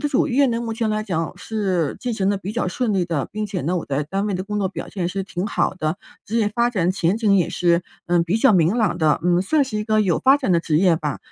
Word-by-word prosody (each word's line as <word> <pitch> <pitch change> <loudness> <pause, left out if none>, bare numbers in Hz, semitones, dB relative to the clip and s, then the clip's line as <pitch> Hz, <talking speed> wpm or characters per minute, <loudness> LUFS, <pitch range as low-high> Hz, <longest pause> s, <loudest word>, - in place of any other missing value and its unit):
的 295 - 0
主 280 - +2
业 275 0 +3
呢， 230 -2 0
目 230 -1 -3
前 225 0 -1
来 215 0 -1
讲 165 -6 -3
是 190 -8 -2
进 245 -3 -2
行 195 -2 +1
得 200 - -1
比 195 +1 -6
较 235 0 -2
顺 215 +3 -1
利 185 -2 +1
的。 165 -5 -2
并 215 0 -3
且 200 -4 -4
呢， 175 +4 -1
我 170 - -3
在 140 +1 -1
单 195 +7 -2
位 205 - -1
的 185 0 -2
工 210 +1 -4
作 200 - 0
表 - - -7
现 185 -4 -3
是 195 +2 -3
挺 185 0 -4
好 205 - 0
的， 155 -1 -2 0.3
职 220 - -3
业 215 -2 +2
发 240 0 +2
展 180 -7 +1
前 185 +2 0
景 210 -3 +3
也 180 - +1
是， 170 0 +2 0.2
嗯， 175 -1 +2
比 180 +6 0
较 225 -2 +5
明 170 +2 +3
朗 215 -8 +1
的。 155 -3 +2
嗯， 175 +1 +2
算 300 +9 +2
是 235 -5 -5
一 210 - -2
个 215 0 +2
有 185 -6 +1
发 270 +2 +4
展 265 -8 -2
的 170 -2 +3
职 155 -2 +1
业 180 -3 +4
吧， 150 -3 -3
195 Hz, 315 characters per minute, -21 LUFS, 175-220 Hz, 0.3 s, 较